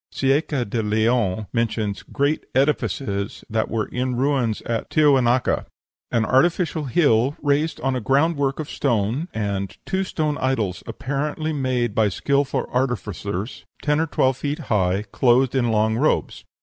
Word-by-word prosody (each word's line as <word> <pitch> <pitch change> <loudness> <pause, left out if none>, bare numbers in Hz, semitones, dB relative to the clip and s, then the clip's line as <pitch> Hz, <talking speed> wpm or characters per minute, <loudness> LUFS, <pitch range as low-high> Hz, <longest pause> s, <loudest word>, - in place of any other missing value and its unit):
Cieça 135 -2 0
de 115 +3 -1
Leon 110 -1 +1
mentions 110 -3 -1
"great 145 +2 -1
edifices" 130 -7 -1
that 110 0 0
were 110 -1 -1
in 125 0 -2
ruins 130 -4 0
at 115 -1 -3
Tiahuanaca, 130 -5 +3 0.4
"an 115 -1 +1
artificial 160 - +2
hill 135 -2 +2
raised 145 +2 0
on 135 -1 0
a 125 - -2
groundwork 140 +3 +1
of 155 - -3
stone," 120 - 0
and 100 -3 -3
"two 190 0 0
stone 155 -5 -2
idols, 115 -9 -1
apparently 150 +3 -3
made 130 -5 0
by 110 -1 +3
skilful 140 +7 0
artificers," 110 - -2 0.2
ten 150 0 +2
or 165 - +1
twelve 130 -3 +1
feet 145 +2 -2 0.2
high, 95 0 +1
clothed 125 0 +3
in 125 -3 +1
long 110 0 +2
robes. 145 +7 0
130 Hz, 140 wpm, -22 LUFS, 110-145 Hz, 0.4 s, Tiahuanaca